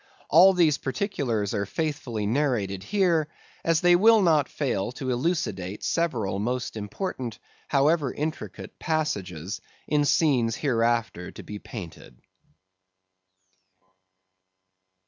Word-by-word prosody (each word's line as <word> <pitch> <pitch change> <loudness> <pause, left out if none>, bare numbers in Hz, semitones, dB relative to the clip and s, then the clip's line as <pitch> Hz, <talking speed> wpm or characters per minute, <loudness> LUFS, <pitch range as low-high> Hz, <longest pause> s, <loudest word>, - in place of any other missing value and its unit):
All 185 +5 +7
these 165 -5 +3
particulars 135 - -2
are 100 -1 -1
faithfully 145 -7 -3
narrated 110 -6 0
here, 170 - +1 0.4
as 165 -1 +2
they 175 0 +6
will 220 +3 +6
not 155 -5 +3
fail 120 -7 -2
to 130 0 -3
elucidate 120 - -2
several 115 - 0
most 125 +3 -2
important, 115 - -4 0.3
however 145 0 +2
intricate 155 +2 -5
passages, 100 - -2 0.3
in 150 -1 +2
scenes 130 -8 +2
hereafter 115 - 0
to - - -10
be 105 0 -7
painted. 85 - -10
130 Hz, 105 wpm, -26 LUFS, 105-160 Hz, 0.4 s, All